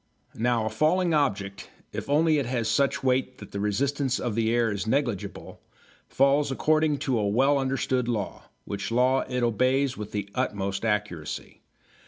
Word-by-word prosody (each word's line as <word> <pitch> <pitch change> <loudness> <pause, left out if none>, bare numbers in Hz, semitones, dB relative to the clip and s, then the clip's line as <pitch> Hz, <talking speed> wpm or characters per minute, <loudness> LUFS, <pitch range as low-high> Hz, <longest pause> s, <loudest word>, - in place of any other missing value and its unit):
Now 115 -1 0
a - - 0
falling 175 +2 +2
object, 100 -9 -1 0.2
if - - -5
only 155 +1 +3
it 135 - -2
has 120 -3 -1
such 140 +5 +1
weight 130 0 +1
that 100 - -11
the 100 - -4
resistance 130 +6 0
of 120 -3 -2
the 110 +1 +1
air 115 -1 +2
is 100 +1 -3
negligible, 120 -5 -2 0.5
falls 140 +1 +2
according 155 +2 +2
to 125 -4 +1
a 105 - 0
well 135 +7 +3
understood 130 -2 0
law, 110 -5 -3 0.2
which 100 -1 -4
law 125 +3 +3
it 125 -1 -1
obeys 130 +3 +1
with 105 0 -6
the 105 -2 -3
utmost 100 0 -2
accuracy. 105 -8 -3
125 Hz, 165 wpm, -26 LUFS, 105-140 Hz, 0.5 s, only